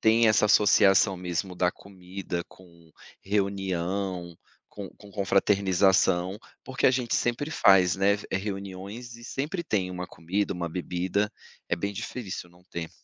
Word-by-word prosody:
tem 115 +1 +5
essa 110 0 +4
associação 100 -2 +5
mesmo 90 +1 -3
da 90 0 +2
comida 90 -2 -6
com 85 -3 -19 0.3
reunião, 95 -3 -2 0.3
com 100 -2 -8
com 105 - -15
confraternização, 95 -2 +2 0.3
porque 130 0 0
a - - +7
gente 125 -2 0
sempre 120 +5 0
faz, 95 -10 +5
né, 95 +1 +3 0.2
eh, - - +1
reuniões 100 +4 -6
e 120 - -14
sempre 150 +8 -3
tem 95 - -1
uma 90 0 -5
comida, 90 +6 -2
uma 90 -2 -3
bebida, 90 +4 -1 0.4
é - - +1
bem 100 +4 -3
difícil 100 -4 -6
não 90 +1 -22
ter. 85 -2 -6
95 Hz, 145 wpm, -27 LUFS, 90-105 Hz, 0.4 s, a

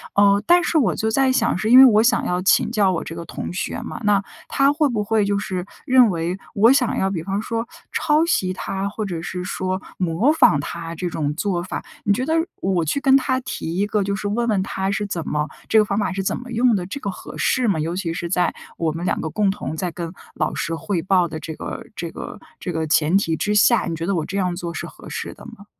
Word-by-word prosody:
呃， 200 0 +5
但 350 +1 +5
是 335 - +1
我 275 - +2
就 220 - -1
在 265 +2 +3
想， 235 -5 +1
是 215 +3 -1
因 250 - +8
为 265 - +11
我 215 -4 +6
想 240 - +2
要 180 0 0
请 195 - +3
教 205 -5 +3
我 170 - -2
这 165 - -7
个 170 0 -7
同 - - -6
学 185 +5 -3
嘛， 235 - -6
那 205 -1 +3 0.2
他 275 0 +3
会 300 0 +2
不 220 -4 -1
会 215 0 +1
就 200 0 +1
是 185 -3 -3 0.2
认 255 -4 +6
为 170 +1 -2 0.2
我 225 +4 +5
想 260 -3 +2
要 190 - +1
比 175 -5 -2
方 195 +2 -2
说 230 +1 -3 0.2
抄 305 +1 +2
袭 185 - +1
他， 195 +1 -3
或 210 +1 -4
者 175 -4 -4
是 180 +1 -5
说 185 0 -3 0.2
模 180 - +2
仿 230 - +5
他 165 +2 -6
这 175 +2 -3
种 150 -3 -2
做 180 0 -1
法。 185 - -5 0.2
你 200 - +4
觉 250 +6 -1
得 315 - 0 0.3
我 185 -3 +1
去 160 - 0
跟 270 -1 +6
他 260 -1 0
提 210 -9 -5
一 200 - +2
个 210 -1 0
就 200 +1 -1
是 205 0 -4
问 235 +3 0
问 210 -4 +2
他 190 0 -2
是 205 +1 -1
怎 170 -5 -4
么 150 0 -1 0.2
这 225 - +3
个 215 - +7
方 200 0 -2
法 205 -3 0
是 195 +1 -2
怎 - - -1
么 250 0 -9
用 240 0 +3
的， 180 -3 -2
这 205 +10 -6
个 200 - -3
合 - - -10
适 255 -2 +1
吗？ 195 -7 +1
尤 160 +3 -2
其 180 -3 -2
是 170 0 -4
在 180 0 +1 0.2
我 165 -2 0
们 165 +2 -5
两 - - 0
个 160 - -3
共 205 +2 +1
同 155 -6 -5
在 175 +2 -3
跟 170 -1 -6 0.2
老 - - -1
师 170 - -2
汇 165 +2 -2
报 185 0 +2
的 160 -1 -6
这 160 - -6
个 - - -6
这 170 - -4
个 - - -8 0.2
这 180 - -4
个 160 -1 -2
前 155 +3 +3
提 165 -5 0
之 210 +5 -1
下， 215 +3 +4
你 165 - -2
觉 165 +1 -4
得 195 +2 0
我 160 -3 -1
这 195 - -4
样 180 -2 0
做 170 -1 -5
是 - - -5
合 - - -12
适 - - -5
的 - - -15
吗？ 230 -3 -12
195 Hz, 280 characters per minute, -21 LUFS, 170-225 Hz, 0.3 s, 为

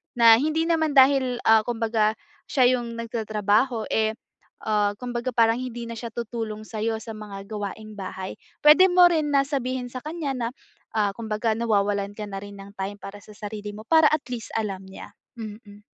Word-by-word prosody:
na 230 -2 +8
hindi 310 +4 0
naman 320 -2 +2
dahil, 260 -2 +5
ah, 220 -1 +6
kumbaga 225 -2 0 0.4
siya 255 -2 +4
'yung 235 -2 -5
nagtatrabaho, 220 +1 0
eh, 220 0 +2 0.5
ah, 210 -1 +2
kumbaga 245 0 -3
parang 230 -1 +4
hindi 240 -2 -5
na 230 - -5
siya 230 0 -6
tutulong 225 -2 -5
sayo 220 0 -2
sa 225 +1 -7
mga 200 -2 -9
gawaing 215 0 -6
bahay. 190 -1 -6 0.3
Puwede 310 +6 +8
mo 355 0 +7
rin 310 -3 0
na 275 0 +5
sabihin 255 -3 -2
sa 255 - -5
kanya 305 -3 -3
na, 235 -2 -2 0.5
ah, 205 -2 +2
kumbaga 220 0 -1
nawawalan 205 -3 0
ka 210 - -4
na 195 - -5
rin 200 -1 -10
ng 200 +1 -11
time 200 +1 -4
para 200 +1 -9
sa 215 - -14
sarili 210 0 -6
mo 215 +1 -10
para 320 -2 +6
at 310 -2 +1
least 245 -3 -6
alam 195 -3 -3
niya. 190 - -11 0.3
Mm. 210 -1 -9
225 Hz, 180 wpm, -25 LUFS, 210-255 Hz, 0.5 s, na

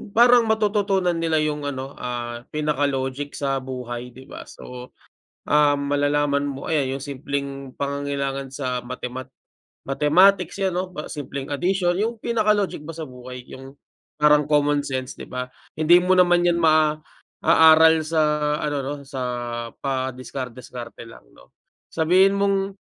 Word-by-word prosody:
parang 240 0 +6
matututunan 205 -4 +1
nila 165 -1 0
yung 150 -1 -2
ano, 135 -1 -5
ah, 120 -1 -5
pinaka 150 -2 0
logic 135 +1 -3
sa 135 -1 -1
buhay, 125 -2 -7
'di 130 - -12
ba? - - -11
So, 125 0 -11 0.5
ah, 145 -1 +4
malalaman 145 0 0
mo 135 0 -7
ayan, 135 -4 0
yung - - -10
simpleng 140 0 -5
pangangailangan 140 -1 -3
sa 130 -2 -3
mathemat 125 +1 -7 0.5
mathematics, 180 +7 +3
'yan 185 -2 0
'no. 185 0 -3
Pa 150 - -6
simpleng 140 -2 -6
addition, 175 +4 0
yung 220 +2 -2
pinaka 220 -3 +2
logic 200 -7 -2
ba 165 - -7
sa 160 -3 -7
buhay, 125 0 -10
yung 135 +1 -11 0.5
parang 150 -1 +5
common 145 -1 +2
sense, 130 -1 -4
'di - - -8
ba? 125 0 -5 0.2
Hindi 160 +3 +5
mo 185 - +4
naman 175 -1 +4
yan 170 -1 +2
maaaral 160 +1 +4
sa 160 0 +1 0.4
ano 145 -1 -1
'no, 145 - -3 0.2
sa 135 -2 -5 0.6
padiskar-diskarte 130 -2 -5
lang, 115 - -13
'no? - - -20 0.4
Sabihin 185 +5 +3
mong 200 -1 0
145 Hz, 140 wpm, -23 LUFS, 130-170 Hz, 0.6 s, parang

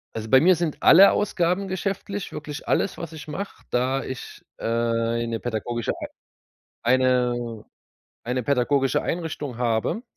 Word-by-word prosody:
Also, 110 0 -5
bei 130 - +7
mir 180 +2 +6
sind 165 -2 -2
alle 195 +4 +8
Ausgaben 190 -1 0
geschäftlich, 195 +1 -3
wirklich 150 -1 -7
alles, 195 - 0
was 165 -1 -6
ich 155 -1 -9
mache, 195 +7 -6
da 130 +2 +1
ich 130 - -8
äh, - - -12
eine 115 0 0
pädagogische 120 0 -2 0.9
Ei 120 +2 +4
eine 125 -3 +1 0.6
eine 125 +1 -2
pädagogische 135 +1 +1
Einrichtung 155 -7 -4
habe 120 - 0
130 Hz, 135 wpm, -24 LUFS, 120-170 Hz, 0.9 s, alle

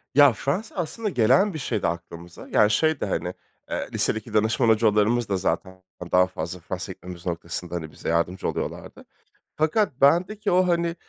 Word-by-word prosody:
Ya 145 -3 +7
Fransa 145 - -3
aslında 205 +5 -3
gelen 135 - +3
bir 155 - -5
şeydi - - -1
aklımıza. 85 0 -7
Yani 105 0 +4
şey 155 +4 +2
de - - -1
hani, - - -2 0.4
eee, - - -3
lisedeki 110 0 -1
danışman 110 +3 +2
hocalarımız 110 +1 +3
da 95 - +1
zaten 95 0 -3 0.3
daha 90 0 +5
fazla 90 0 -6
Fransa'ya 95 +2 -5
gitmemiz 90 -1 -11
noktasında, 85 0 -4
hani, 80 -3 -5
bize - - -6
yardımcı 85 +2 0
oluyorlardı. - - -5 0.5
Fakat 155 - 0
bendeki 180 +9 +3
o, 180 +1 +4
hani, 170 -1 +1
110 Hz, 160 wpm, -24 LUFS, -, 0.5 s, Ya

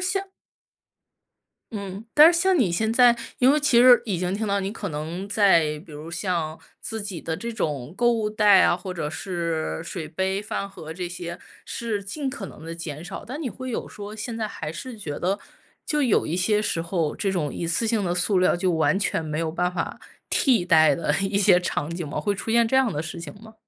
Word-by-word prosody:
像 390 +1 -1 1.4
嗯， 200 0 -6
但 310 +3 +9
是 335 - +1
像 375 -1 +3
你 210 -9 +3
现 220 +5 +1
在， 240 0 +6 0.2
因 260 +2 +5
为 300 - +2
其 285 -5 +4
实 245 -1 +8
已 200 -7 -2
经 180 +2 -1
听 215 +1 -2
到 200 0 +1
你 195 +1 -3
可 205 -2 -5
能 165 +5 -5
在， 170 -8 +3
比 155 - -13
如 150 +3 -8
像 170 -3 -2 0.2
自 225 -1 -5
己 200 -5 -5
的 160 -1 -3
这 235 +6 -5
种 150 - -3
购 240 +1 +3
物 220 -2 0
袋 210 -3 +5
啊， - - +4
或 185 0 -6
者 160 -4 -3
是 165 -2 -3
水 165 -3 -6
杯、 190 +4 -1
饭 200 -1 -4
盒 160 -5 -9
这 180 +1 -4
些 170 -1 -6 0.3
是 220 -4 -3
尽 270 +8 -4
可 245 -7 -5
能 155 - -12
地 165 - -5
减 160 -2 -7
少， 195 +2 -7
但 270 +6 -6
你 280 - -2
会 255 +2 -7
有 230 - -3
说 205 +1 -8
现 225 +1 -5
在 215 -2 -2
还 150 -4 -6
是 225 +6 -8
觉 150 -7 -5
得 190 +3 0 0.5
就 300 -1 +1
有 245 -6 +2
一 165 - -2
些 210 +3 +2
时 165 -5 -1
候， 165 -3 -1
这 195 - -1
种 165 -6 -2
一 - - -4
次 170 +7 0
性 220 -3 +1
的 175 - 0
塑 180 +2 +1
料 185 - +3
就 180 0 +1
完 165 +4 +2
全 165 -5 -1
没 155 0 -3
有 165 -1 -1
办 180 +2 0
法 - - -4 0.3
替 245 -9 +3
代 155 -5 +5
的 155 -3 0
一 195 0 0
些 190 -3 +5
场 150 -4 -2
景 170 -2 -4
吗？ - - -3
会 205 -1 0
出 225 - -5
现 235 0 +4
这 265 - +1
样 260 -5 +3
的 145 - -2
事 160 +2 -6
情 155 -4 -7
吗？ 220 0 -14
195 Hz, 245 characters per minute, -24 LUFS, 170-225 Hz, 1.4 s, 但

